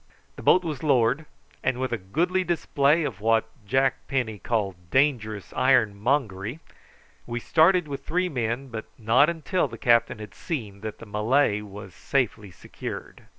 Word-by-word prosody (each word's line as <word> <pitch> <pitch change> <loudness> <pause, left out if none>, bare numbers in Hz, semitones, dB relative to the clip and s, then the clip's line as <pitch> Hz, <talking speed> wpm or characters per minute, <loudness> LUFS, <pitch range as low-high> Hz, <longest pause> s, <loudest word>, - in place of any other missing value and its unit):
The - - -9
boat 185 - +5
was 155 -6 -4
lowered, 140 +1 +2 0.4
and 130 -1 +1
with 130 -1 -2
a 120 - 0
goodly 175 - 0
display 160 -2 +2
of 110 -9 -4
what 115 0 +3 0.2
Jack 135 +3 +1
Penny 120 -7 -2
called 95 -5 -2
dangerous 115 -7 0
ironmongery, 110 0 +1 0.7
we 120 0 -3
started 170 +5 +4
with 140 -1 -6
three 180 +5 0
men, 125 -2 -2
but 110 -2 -6
not 120 +7 +4
until 170 +3 -1
the 115 - -9
captain 120 0 +3
had 105 -2 -9
seen 110 - -5
that 110 -1 -6
the - - -11
Malay 105 +2 +1
was 100 -2 -10
safely 115 -6 -1
secured. 90 - -9
120 Hz, 150 wpm, -25 LUFS, 105-145 Hz, 0.7 s, boat